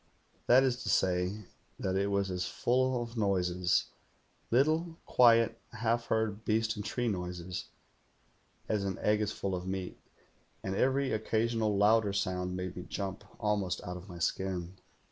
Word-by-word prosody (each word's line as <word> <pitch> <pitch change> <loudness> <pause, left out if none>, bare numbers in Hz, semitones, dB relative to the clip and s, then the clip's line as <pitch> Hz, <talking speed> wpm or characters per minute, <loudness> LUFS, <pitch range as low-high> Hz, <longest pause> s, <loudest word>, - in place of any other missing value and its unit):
That 130 +2 +7
is 125 -2 0
to - - -3
say, 90 +3 +1 0.4
that 95 0 -1
it 100 +1 +1
was 100 -1 0
as 90 -1 -2
full 130 0 +1
of 115 0 -9
noises 90 -4 +2 0.3
— - - -39
little, 160 +6 +2
quiet, 115 -2 +5
half 115 +1 0
heard 110 -1 0
beast 110 0 +1
and 105 - -5
tree 120 +4 -2
noises 90 -3 -3 0.5
— - - -38
as 105 -2 0
an 95 -1 -2
egg 105 0 +2
is 105 - 0
full 95 - -3
of 90 0 -3
meat; 95 -1 -4 0.6
and 95 - -2
every 135 +4 +2
occasional 110 -1 0
louder 105 0 +4
sound 90 -1 -1
made 90 0 -4
me 90 - -5
jump 100 0 -4 0.2
almost 105 -4 0
out 90 - -5
of 90 +3 -10
my 90 - -8
skin. 90 +1 -2
100 Hz, 165 wpm, -31 LUFS, 90-115 Hz, 0.6 s, That